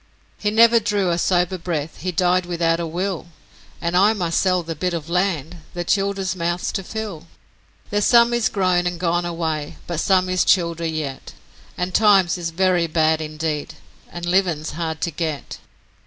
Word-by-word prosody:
'He 210 - 0
never 230 +2 +6
drew 205 -4 0
a 170 - 0
sober 180 +1 +1
breath, 160 -3 -4
he 185 +2 -2
died 180 +1 +1
without 165 -1 +1
a 170 - -2
will, 180 +1 -3 0.5
And 170 +1 -2
I 200 +4 +5
must 175 -5 0
sell 180 -2 +1
the 165 0 -4
bit 175 +3 -2
of 165 0 -6
land 175 -3 -1 0.2
the 175 - -2
childer's 195 0 0
mouths 175 0 -2
to 195 - -3
fill. 200 -6 -6 0.6
There's 205 0 +1
some 235 0 +5
is 240 -2 +2
grown 185 -3 +1
and 175 -1 -3
gone 175 0 0
away, 160 -3 -3
but 170 -3 -3
some 185 +1 +2
is 185 0 +1
childer 170 -2 +2
yet, 155 -4 -5 0.4
And 180 +1 -2
times 200 -4 +4
is 170 -1 -2
very 175 0 +1
bad 160 0 +2
indeed 155 -1 -4 0.4
a 175 - -7
livin's 175 -3 0
hard 160 -1 -4
to 170 - -1
get. 155 -2 -4
175 Hz, 175 wpm, -21 LUFS, 165-190 Hz, 0.6 s, never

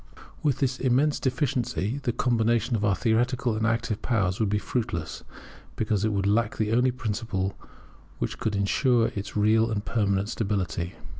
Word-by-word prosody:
With 145 -5 +1
this 130 -2 0
immense 135 +4 +2
deficiency 130 - -1
the 120 - 0
combination 115 -1 +1
of 105 - -2
our 100 -2 +3
theoretical 120 +3 +1
and 110 +1 0
active 115 -2 -1
powers 95 -6 0
would 110 -3 +1
be 105 - +1
fruitless, 110 -6 -3 0.5
because 105 -2 0
it 110 - +2
would 100 -1 0
lack 110 +2 +1
the 110 -1 0
only 125 +3 +3
principle 105 -5 -2 0.6
which - - -3
could 105 -2 -1
ensure 115 +4 +2
its 100 +1 -5
real 110 +2 +3
and 105 -2 -2
permanent 100 -3 0
stability. 95 -5 -2
110 Hz, 160 wpm, -26 LUFS, 100-120 Hz, 0.6 s, our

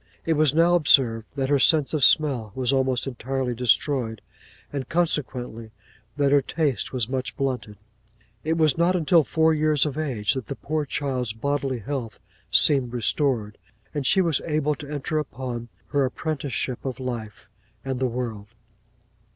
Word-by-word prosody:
It 165 - +2
was 155 -2 +3
now 170 +2 +4
observed 130 -9 +4
that 135 -1 -1
her 145 -1 +3
sense 150 +2 +3
of 150 -4 0
smell 130 -9 +4
was 130 0 0
almost 130 -2 +1
entirely 130 0 -3
destroyed; 120 -1 +1 0.5
and, 135 -2 -4
consequently, 125 -9 -1 0.5
that 140 -1 +2
her 145 0 +5
taste 140 -4 -1
was 125 -4 -1
much 130 0 -4
blunted. 125 -6 -3 0.7
'It 160 - 0
was 155 -2 +3
not 175 +2 +3
until 165 -1 +4
four 160 +2 +2
years 155 -2 +2
of 150 0 -3
age 115 -9 0
that 130 -4 -5
the 140 - -4
poor 150 +6 -2
child's 130 -5 -2
bodily 135 +2 -1
health 120 0 -5 0.3
seemed 130 -5 +3
restored, 120 -3 -1 0.3
and 145 - -2
she 190 - +4
was 165 -6 +1
able 150 -1 +1
to 145 -1 -9
enter 150 +1 -2
upon 125 -4 -5 0.2
her 145 -2 +2
apprenticeship 135 -2 -3
of 130 -2 -4
life 120 -5 -6 0.4
and 130 -2 -2
the 130 - +1
world. 115 -4 -4
135 Hz, 160 wpm, -24 LUFS, 125-150 Hz, 0.7 s, her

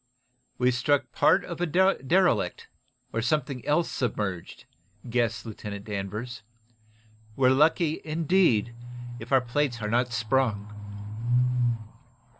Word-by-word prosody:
"We 125 0 +3
struck 135 +3 +1
part 185 - +3
of 170 -1 -6
a 175 - +1
derelict, 180 - +2 0.5
or 115 - 0
something 135 0 -1
else 160 +3 +2
submerged," 105 -7 -3 0.4
guessed 115 -3 0
Lieutenant 105 -2 -7
Danvers. 105 +3 -5 0.9
"We're 130 -1 +4
lucky, 155 +3 +3
indeed, 155 - +2 0.5
if 115 +3 -10
our 135 -1 +5
plates 125 0 -1
are 105 -1 -3
not 120 +1 +1
sprung." 115 -3 0
125 Hz, 105 wpm, -27 LUFS, 110-150 Hz, 0.9 s, our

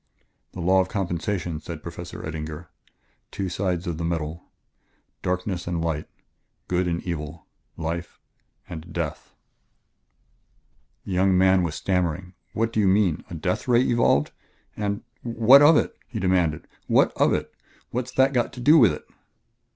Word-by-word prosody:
"The 90 - -6
law 95 +2 +4
of 95 - -3
compensation," 90 -3 -2
said 80 -1 -8
Professor 85 0 -7
Eddinger. 80 +1 -6 0.6
"Two 95 -2 -3
sides 90 -1 -1
to 85 - -3
the 80 +2 -5
medal! 80 0 -3 0.8
Darkness 90 0 -2
and 85 -1 -1
light 80 -2 -2 0.6
good 90 0 0
and 85 0 -2
evil 80 -2 -5 0.3
life... 85 +1 -4 0.5
and 85 +1 -8
death!" 85 -4 -4 1.7
The - - -6
young 95 0 +3
man 95 0 +5
was 85 -4 -2
stammering. 90 0 -1 0.2
"What 115 +1 -1
do - - +1
you 100 - +3
mean? 95 -4 +2
a 85 - -6
death 90 +8 -2
ray 120 -1 +5
evolved?" 115 - +2 0.4
And: 100 -1 -2 0.2
"What 120 +3 +6
of 150 +2 +7
it?" - - 0
he 115 - -5
demanded; 90 -5 +1 0.2
"what - - +4
of - - +3
it? - - -2 0.4
What's 125 +1 -3
that 135 +1 +3
got 120 -2 0
to - - -9
do 150 +6 +6
with 115 -8 +6
it?" - - -8
90 Hz, 150 wpm, -24 LUFS, 85-100 Hz, 1.7 s, of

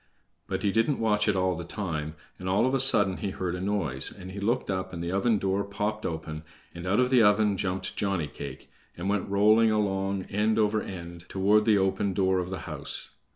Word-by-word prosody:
But - - -3
he 100 - +2
didn't 115 +7 +1
watch 105 -2 +1
it 105 - +2
all 95 0 +1
the 85 - -6
time, 80 -4 -4 0.2
and 90 0 -4
all 100 +5 +3
of 130 - 0
a 135 - +2
sudden 100 -8 +5
he 100 - -3
heard 95 -2 -3
a 90 - -4
noise, 95 -10 0
and 95 0 -10
he 100 - -7
looked 115 +1 0
up 95 -1 -3
and 85 -1 -5
the 85 - -3
oven 105 +4 +2
door 100 0 0
popped 105 +2 -3
open, 80 -1 -5 0.3
and 85 +1 -7
out 100 +5 +2
of 125 0 +2
the 125 -2 +6
oven 105 -1 +4
jumped 95 0 -2
Johnny 95 -5 -1
cake, 70 - -9 0.3
and 90 +3 -3
went 100 -2 -1
rolling 110 +3 +4
along 95 -2 0
end 105 +3 0
over 110 0 +2
end, 85 -2 -8
toward 105 +2 +3
the 110 -2 +4
open 95 0 0
door 95 -1 +2
of 90 0 -3
the 95 - -5
house. - - -2
100 Hz, 220 wpm, -27 LUFS, 90-105 Hz, 0.3 s, the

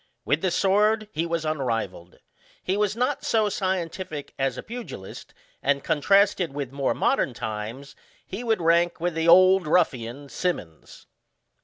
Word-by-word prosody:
With 150 +3 +1
the 190 - +1
sword 210 +4 +2
he 165 -3 -2
was 165 -1 -2
unrivalled. 115 - -3 0.5
He 185 - 0
was 210 0 0
not 255 +4 -1
so 215 -2 +2
scientific 185 -5 -3
as 135 -2 0
a - - -6
pugilist; 230 - -8 0.3
and, 140 0 +1
contrasted 190 -1 +2
with 140 -3 -4
more 140 -1 -1
modern 125 - +1
times, 110 +5 -6 0.3
he 200 +6 -6
would 225 -6 0
rank 170 +1 +3
with 175 +1 -1
the 165 +1 -1
Old 185 +1 +6
Ruffia7f, 140 -5 0
Symonds. 90 - -4
165 Hz, 145 wpm, -25 LUFS, 135-195 Hz, 0.5 s, Old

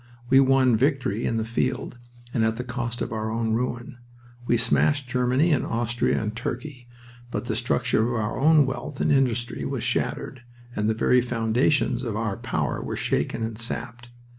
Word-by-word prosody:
We 135 - +7
won 130 -2 +4
victory 130 -4 0
in 115 - 0
the 110 - -1
field 115 +1 -2 0.3
and 115 - +1
at 110 0 +1
the 125 - -4
cost 120 -1 -3
of - - -5
our 110 0 -2
own 110 0 -1
ruin. 120 +1 -3 0.5
We 120 - +3
smashed 140 +3 +2
Germany 125 +6 +2
and 145 - +2
Austria 120 +1 0
and 110 0 -3
Turkey, 125 +1 -5 0.4
but 120 - -4
the 115 -2 -2
structure 115 -1 +1
of 120 - -2
our 105 +3 -2
own 155 +1 +5
wealth 135 +1 -5
and - - +2
industry 125 -4 +1
was 135 -4 -3
shattered, 125 +2 -2 0.3
and 105 +1 0
the 110 - +1
very 125 +3 +3
foundations 120 +1 +1
of 115 -4 -3
our 105 -3 -2
power 115 - -2
were - - -4
shaken 115 - -1
and 110 -1 -4
sapped. 120 +1 -4
120 Hz, 180 wpm, -25 LUFS, 115-130 Hz, 0.5 s, We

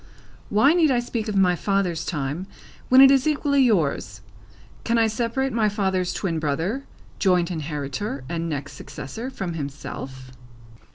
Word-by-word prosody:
Why 240 +9 +4
need 335 -3 +4
I 250 -2 +3
speak 235 -2 -3
of 210 - -2
my 185 -2 +4
father's 190 -3 0
time, 150 +3 -3 0.4
when 255 +1 +8
it 270 0 +9
is 270 +1 +3
equally 285 -2 +2
yours? 150 - +1 0.6
Can 235 0 +1
I 225 - +4
separate 235 +4 -1
my 220 -2 +2
father's 190 -3 0
twin 170 -5 -2
brother, 165 - -2 0.3
joint 180 -3 +2
inheritor, 150 0 -4
and 170 +1 -3
next 145 -2 -4
successor, 225 - -7
from 190 -9 -5
himself?" 135 -3 -7
190 Hz, 150 wpm, -24 LUFS, 155-235 Hz, 0.6 s, it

